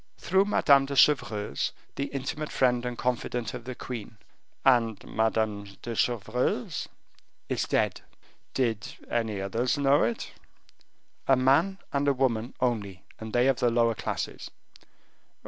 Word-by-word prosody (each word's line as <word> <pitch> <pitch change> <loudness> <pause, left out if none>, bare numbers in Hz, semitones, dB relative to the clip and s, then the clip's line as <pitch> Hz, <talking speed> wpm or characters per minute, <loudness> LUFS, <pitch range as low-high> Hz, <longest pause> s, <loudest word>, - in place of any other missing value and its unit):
"Through 190 +2 +2
Madame 140 -9 +4
de 140 - -4
Chevreuse, 110 - +2 0.2
the 140 - -1
intimate 140 +2 -4
friend 125 -2 +2
and 120 -1 -4
confidante 125 -2 -2
of 120 -2 -8
the 130 0 -5
queen." 115 -4 -7 0.5
"And 115 -5 +4
Madame 105 -3 -1
de 120 - -4
Chevreuse 120 +1 -1 0.3
" - - -35
"Is - - 0
dead." - - +1 0.5
"Did 115 -5 -1 0.2
any 110 -4 -1
others 115 +8 0
know 140 0 +4
it?" 115 +1 -1 1.0
"A 135 - +6
man 140 +10 +3 0.2
and 140 0 +1
a 140 - +5
woman 125 -2 0
only, 105 -7 -1 0.2
and 110 0 -7
they 120 +2 +3
of 135 -2 +3
the 120 - +3
lower 115 0 +3
classes." - - -4
120 Hz, 140 wpm, -28 LUFS, 110-135 Hz, 1.0 s, A